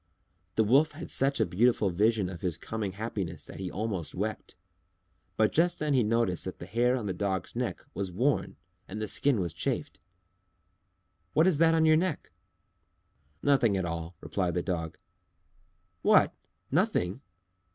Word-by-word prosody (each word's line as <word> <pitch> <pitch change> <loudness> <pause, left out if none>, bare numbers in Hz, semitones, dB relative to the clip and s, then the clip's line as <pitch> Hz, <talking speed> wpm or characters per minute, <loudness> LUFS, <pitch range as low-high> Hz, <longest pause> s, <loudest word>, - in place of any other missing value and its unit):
The 110 - +4
Wolf 140 +9 +4
had 160 +3 -7
such 135 0 +1
a 110 - +4
beautiful 105 0 +2
vision 105 +2 +2
of 90 -1 -7
his 90 -4 -2
coming 105 +1 -4
happiness 100 -4 -4
that - - -10
he 95 -2 -3
almost 100 -5 -4
wept. 110 +4 -4 0.8
But 110 -1 +3
just 175 +2 +2
then 150 -1 0
he 130 - +4
noticed 110 -5 +1
that 95 - -5
the - - -8
hair 120 +7 +2
on 120 -5 -3
the 95 - -1
Dog's 95 -2 -2
neck - - -3
was 95 0 -3
worn 130 +10 0 0.3
and 105 +3 -6
the 110 - -2
skin 130 +3 +2
was 85 -3 -2
chafed. - - -3 1.3
"What 160 - +4
is 180 -6 +3
that 165 0 +5
on 160 0 +4
your 155 0 +6
neck?" 175 -2 -2 1.1
"Nothing 120 -8 +3
at 95 - -1
all," 85 +1 -4
replied 90 -3 -2
the 90 - 0
Dog. 80 -4 -3 1.0
"What! - - +5 0.4
nothing!" 90 +9 +1
110 Hz, 160 wpm, -29 LUFS, 90-130 Hz, 1.3 s, your